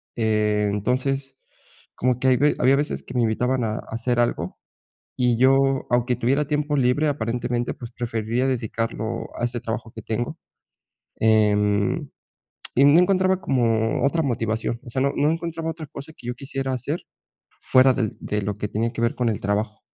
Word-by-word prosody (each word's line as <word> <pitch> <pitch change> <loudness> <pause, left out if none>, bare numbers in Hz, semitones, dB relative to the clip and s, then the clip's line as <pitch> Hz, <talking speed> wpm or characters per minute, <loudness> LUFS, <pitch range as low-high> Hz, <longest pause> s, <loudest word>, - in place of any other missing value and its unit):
eh, 105 -2 +1
entonces 135 +5 -1 0.6
como 125 0 +1
que 130 - +1
hay 130 -1 +5
ve 145 +4 +3
había 130 +2 +5
veces 145 +2 -1
que 125 - -10
me 125 - +2
invitaban 125 +3 +1
a 110 -1 -1
hacer 120 +2 -1
algo 120 - -1 0.6
y 125 -2 +2
yo, 135 +1 +3
aunque 120 +1 +2
tuviera 135 +5 +1
tiempo 150 0 0
libre, 135 +4 +2
aparentemente, 120 -2 -1
pues, 120 -2 -9
preferiría 115 +1 -1
dedicarlo 115 -3 -2
a - - -1
ese 120 0 -2
trabajo 115 0 -4
que 110 - -9
tengo. 120 +9 -3 0.8
Em, 105 -2 +2 0.7
y 135 - +6
no 145 +4 +7
encontraba 185 0 +2
como 115 -5 +1
otra 165 +4 +2
motivación. 115 -2 -1
O - - -9
sea, 130 +2 -1
no 140 - +2
no 150 +2 +3
encontraba 165 0 -3
otra 160 -2 -8
cosa 145 +1 -9
que 120 - -12
yo 120 - -3
quisiera 135 0 -4
hacer 140 +7 -3 0.6
fuera 130 0 +5
del 115 -5 -2
de 105 0 -2
lo 105 0 -3
que 105 - -3
tenía 115 +2 -1
que 115 - -4
ver 115 +5 +1
con 125 -2 +1
el 105 - -2
trabajo. 105 +2 -1
125 Hz, 175 wpm, -23 LUFS, 110-135 Hz, 0.8 s, no